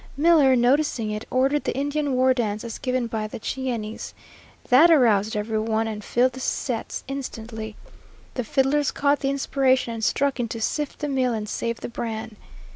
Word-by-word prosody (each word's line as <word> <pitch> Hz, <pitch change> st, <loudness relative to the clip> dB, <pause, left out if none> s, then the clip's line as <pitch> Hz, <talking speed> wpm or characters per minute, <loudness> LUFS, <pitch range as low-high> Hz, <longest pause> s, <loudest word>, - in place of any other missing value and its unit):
Miller, 295 Hz, -4 st, +5 dB
noticing 245 Hz, -2 st, +2 dB
it, 210 Hz, +1 st, -5 dB
ordered 270 Hz, +3 st, +2 dB
the -, -, -2 dB
Indian 285 Hz, 0 st, -1 dB
war 260 Hz, +1 st, +4 dB
dance 215 Hz, -4 st, -2 dB
as 230 Hz, -1 st, -6 dB
given 255 Hz, -2 st, -1 dB
by 220 Hz, -2 st, -3 dB
the 215 Hz, -, -8 dB
Cheyennes. 230 Hz, -3 st, -4 dB, 0.5 s
That 285 Hz, +7 st, +7 dB
aroused 220 Hz, -8 st, +4 dB
every 215 Hz, +1 st, -1 dB
one 220 Hz, 0 st, 0 dB
and 210 Hz, -1 st, -5 dB
filled 250 Hz, +4 st, +2 dB
the 260 Hz, -, -8 dB
sets 245 Hz, -2 st, -3 dB
instantly. 225 Hz, -5 st, -6 dB, 0.6 s
The 250 Hz, -, -2 dB
fiddlers 270 Hz, +4 st, +1 dB
caught 285 Hz, 0 st, +1 dB
the 275 Hz, -, -1 dB
inspiration 265 Hz, -3 st, +1 dB
and 225 Hz, -1 st, -5 dB
struck 275 Hz, +3 st, +1 dB
into 230 Hz, -1 st, -3 dB
"Sift 295 Hz, +6 st, -2 dB
the 295 Hz, -, -1 dB
Meal 260 Hz, -3 st, +1 dB
and 215 Hz, -1 st, -4 dB
save 230 Hz, +2 st, -3 dB
the -, -, -4 dB
Bran." 225 Hz, -2 st, -5 dB
250 Hz, 175 wpm, -24 LUFS, 220-275 Hz, 0.6 s, That